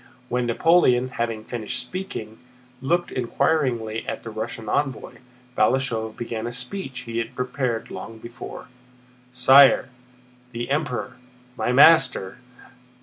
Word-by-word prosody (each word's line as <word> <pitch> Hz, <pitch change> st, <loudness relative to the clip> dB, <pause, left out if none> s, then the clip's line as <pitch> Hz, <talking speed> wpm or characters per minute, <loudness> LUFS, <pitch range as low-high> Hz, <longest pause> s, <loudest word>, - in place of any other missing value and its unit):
When 125 Hz, 0 st, 0 dB
Napoleon, 130 Hz, -1 st, +3 dB
having 115 Hz, -3 st, -3 dB
finished 120 Hz, +1 st, -4 dB
speaking, 125 Hz, -, -6 dB, 0.4 s
looked 175 Hz, +6 st, 0 dB
inquiringly 125 Hz, -3 st, 0 dB
at -, -, -4 dB
the 115 Hz, -, -7 dB
Russian 110 Hz, 0 st, -6 dB
envoy, 135 Hz, +3 st, -2 dB, 0.4 s
Balashëv 110 Hz, -1 st, 0 dB
began 115 Hz, -1 st, -4 dB
a -, -, -4 dB
speech 130 Hz, +1 st, -5 dB
he 115 Hz, -1 st, -4 dB
had 115 Hz, 0 st, -5 dB
prepared 125 Hz, -2 st, -2 dB
long 115 Hz, 0 st, -8 dB
before: 120 Hz, +2 st, -9 dB, 0.7 s
"Sire! 130 Hz, +2 st, +6 dB, 0.6 s
The 120 Hz, +2 st, -4 dB
Emperor, 130 Hz, -4 st, -2 dB, 0.4 s
my -, -, -1 dB
master..." 130 Hz, -8 st, +5 dB
125 Hz, 115 wpm, -23 LUFS, 115-135 Hz, 0.7 s, Sire